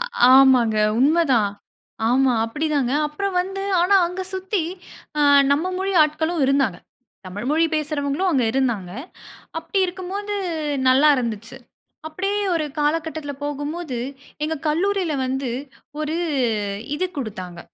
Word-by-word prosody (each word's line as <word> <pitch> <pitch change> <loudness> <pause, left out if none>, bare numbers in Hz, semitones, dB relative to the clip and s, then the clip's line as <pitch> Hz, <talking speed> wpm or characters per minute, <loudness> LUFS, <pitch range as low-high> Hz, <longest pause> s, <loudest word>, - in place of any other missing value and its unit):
அ - - +1 0.3
ஆமாங்க, 255 -4 +6 0.2
உண்ம 300 +6 +4 0.2
தான். 210 -4 +2 0.6
ஆமா, 255 +1 +3
அப்டி 295 +8 -3
தாங்க. 265 -3 +1 0.2
அப்புறம் 385 +5 -3
வந்து 390 +2 -4 0.2
ஆனா 360 +3 +3
அங்க 360 +2 -5
சுத்தி 375 0 -1 0.6
அ - - +2 0.3
நம்ம 300 +5 0
மொழி 390 +1 -1
ஆட்களும் 315 +1 0
இருந்தாங்க. 265 -10 +1 0.5
தமிழ் 205 +5 -6
மொழி 320 +2 +3
பேசுறவங்களும் 305 +3 -1
அங்க 260 -5 +2
இருந்தாங்க. 235 -9 -1 0.7
அப்படி 330 +4 -3
இருக்கும்போது, 380 +3 -5 0.5
நல்லா 270 +4 +5
இருந்துச்சு. 235 0 -4 0.5
அப்படியே 390 +6 -2 0.2
ஒரு 320 -2 0
காலகட்டத்துல 310 0 -1
போகும்போது, 290 -1 -4 0.5
எங்க 315 +1 -1
கல்லூரில 360 +1 0
வந்து 265 -1 -2 0.5
ஒரு 310 +1 -2 0.8
இது 370 +5 -1
குடுத்தாங்க. 185 -8 -6
300 Hz, 120 wpm, -22 LUFS, 255-350 Hz, 0.8 s, ஆமாங்க